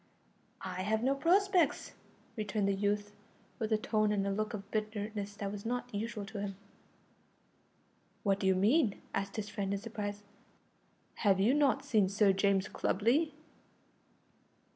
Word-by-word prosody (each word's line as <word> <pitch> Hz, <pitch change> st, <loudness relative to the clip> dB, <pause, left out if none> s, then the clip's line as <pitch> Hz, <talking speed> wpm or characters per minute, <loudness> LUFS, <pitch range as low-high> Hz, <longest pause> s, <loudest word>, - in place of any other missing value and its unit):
"I 185 Hz, -1 st, -4 dB
have 220 Hz, +4 st, 0 dB
no 265 Hz, +2 st, +3 dB
prospects," 355 Hz, +1 st, +2 dB, 0.4 s
returned 210 Hz, -2 st, -1 dB
the 200 Hz, -, +2 dB
youth, 205 Hz, +1 st, -1 dB, 0.5 s
with 220 Hz, 0 st, -2 dB
a 220 Hz, -, +4 dB
tone 215 Hz, 0 st, +1 dB
and 200 Hz, -1 st, 0 dB
look 215 Hz, +1 st, -2 dB
of 200 Hz, -1 st, -9 dB
bitterness 210 Hz, -1 st, -3 dB
that 200 Hz, -1 st, -4 dB
was 200 Hz, -1 st, -6 dB
not 245 Hz, +1 st, -3 dB
usual 210 Hz, 0 st, -3 dB
to 200 Hz, +1 st, -7 dB
him. 200 Hz, -1 st, -4 dB, 1.7 s
"What 200 Hz, -1 st, +2 dB
do 195 Hz, -, 0 dB
you 190 Hz, -, +4 dB
mean?" 215 Hz, -, +3 dB
asked 195 Hz, 0 st, -2 dB
his 215 Hz, -2 st, -4 dB
friend 200 Hz, -2 st, -3 dB
in -, -, -3 dB
surprise, 205 Hz, -2 st, -5 dB, 0.9 s
"have 195 Hz, -3 st, +3 dB
you 215 Hz, +7 st, +4 dB
not 280 Hz, -1 st, +2 dB
seen 215 Hz, -9 st, +3 dB
Sir 200 Hz, 0 st, +4 dB
James 195 Hz, 0 st, +2 dB
Clubley?" 255 Hz, -, +1 dB
210 Hz, 145 wpm, -33 LUFS, 200-225 Hz, 1.7 s, a